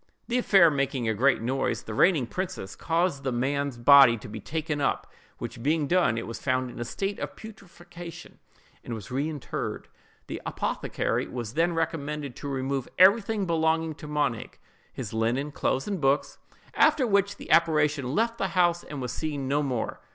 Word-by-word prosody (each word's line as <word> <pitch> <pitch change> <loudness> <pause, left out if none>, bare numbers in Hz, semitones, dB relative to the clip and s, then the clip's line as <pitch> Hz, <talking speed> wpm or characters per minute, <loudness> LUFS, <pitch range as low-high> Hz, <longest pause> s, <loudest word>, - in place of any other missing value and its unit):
The 245 +1 +1
affair 190 -8 +6
making 135 -4 -1
a 110 - +2
great 125 +2 +2
noise, 130 +3 -1
the 110 - -7
reigning 160 - +3
princess 185 - -5
caused 170 -3 0
the 135 -1 -2
man's 135 +2 -1
body 130 -1 +7
to 105 - -10
be 110 +1 -7
taken 155 - -3
up, - - 0 0.3
which - - -7
being 150 +3 +1
done, 170 -8 +2
it 115 - -3
was 115 - -7
found 130 -1 0
in - - -10
a - - -1
state 195 - -3
of - - -5
putrefaction, 175 -5 -11 0.4
and 115 - -5
was 110 0 -9
reinterred. 145 +2 -4 0.4
The - - -6
apothecary - - -2
was 120 -3 -6
then 170 +3 +2
recommended 150 -4 -3
to 145 - -6
remove 135 -1 -2
everything 200 +2 +5
belonging 160 -1 +1
to 150 - -9
Monig—his 145 -9 -4
linen, 120 +6 0
clothes, 135 +1 -1
books, 150 -8 0 0.3
&c.—after 265 - +4
which 200 -2 +2
the - - -8
apparition 150 -4 +3
left 230 +1 0
the 195 - +1
house 175 -1 +3
and 145 -3 -6
was 125 - -3
seen 145 -3 -3
no 145 +2 +1
more. 130 -6 -3
145 Hz, 170 wpm, -27 LUFS, 130-170 Hz, 0.4 s, body